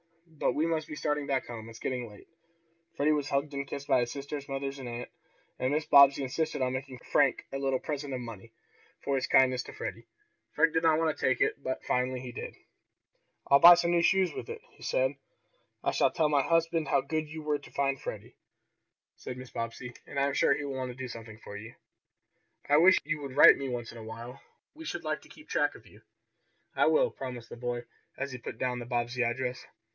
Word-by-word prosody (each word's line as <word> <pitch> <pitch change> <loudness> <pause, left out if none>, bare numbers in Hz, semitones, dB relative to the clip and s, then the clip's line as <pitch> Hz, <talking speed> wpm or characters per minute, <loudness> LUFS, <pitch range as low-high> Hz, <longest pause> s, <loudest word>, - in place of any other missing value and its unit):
But 160 -3 -1
we 155 - +1
must 160 -2 -1
be 155 - -6
starting 150 -1 -1
back 135 -2 0
home. 115 -1 -8
It's 115 - -11
getting 125 0 -3
late." 105 - -15 0.7
Freddie 150 +2 +2
was 145 -2 0
hugged 140 +1 -1
and 140 0 -3
kissed 140 0 -6
by - - +4
his 120 -1 -1
sisters, 140 0 -6
mother 135 0 -2
and 125 -2 -6
aunt, 120 +1 -6 0.5
and 130 - 0
Mrs. 150 +1 -1
Bobbsey 140 0 +8
insisted 145 +1 -1
on 125 0 0
making 130 0 -5
Frank - - +1
a 135 - -2
little 135 -1 +1
present 145 -1 -4
of - - -4
money, 115 -2 -9 0.5
for 140 - -1
his 130 -2 0
kindness 130 -1 +4
to - - -10
Freddie. - - -6 0.5
Frank 160 +1 +3
did 165 - +2
not 160 -1 +4
want 160 -1 +1
to - - -11
take 130 - +2
it, - - +1
but 130 -1 -3
finally 125 0 0
he 125 0 -7
did. - - -7 0.9
"I'll 140 - +6
buy 175 +3 +11
some 170 0 +1
new 170 -1 +3
shoes 185 +1 +3
with - - -7
it," 460 -1 -6
he - - -23
said. - - +1 0.7
"I - - +1
shall - - +3
tell 155 -3 +1
my 145 -2 +3
husband 165 0 +1
how - - +3
good 155 +1 -3
you 155 0 -7
were 150 -1 0
to 140 - -14
find 135 -1 0
Freddie," - - -7 0.8
said 125 - -7
Mrs. 130 0 -10
Bobbsey, 115 +2 -5
"and 140 - -3
I 140 - +3
am 140 - 0
sure - - +3
he 145 - -4
will 140 - -4
want 130 -1 -3
to 125 - -7
do 130 -1 -5
something 115 -2 -9
for 105 - -10
you. 110 +3 -10 0.9
I 145 - +5
wish 185 +4 +7
you 155 0 -2
would 135 -2 -7
write - - +10
to - - -9
me 135 -1 -3
once 120 -2 -4
in 115 - -10
a - - -9
while. 115 +3 -9 0.3
We 320 +1 -11
should - - -4
like - - -2
to - - -18
keep - - -15
track - - +1
of - - -15
you." - - -18 0.7
"I - - +4
will," - - +3
promised 125 -3 -7
the - - -9
boy, 120 0 -3 0.3
as 140 0 -3
he 130 - -6
put 110 - -7
down 125 0 -1
the 120 - -7
Bobbsey 120 0 -1
address. 125 +2 -2
135 Hz, 230 wpm, -30 LUFS, 125-150 Hz, 0.9 s, buy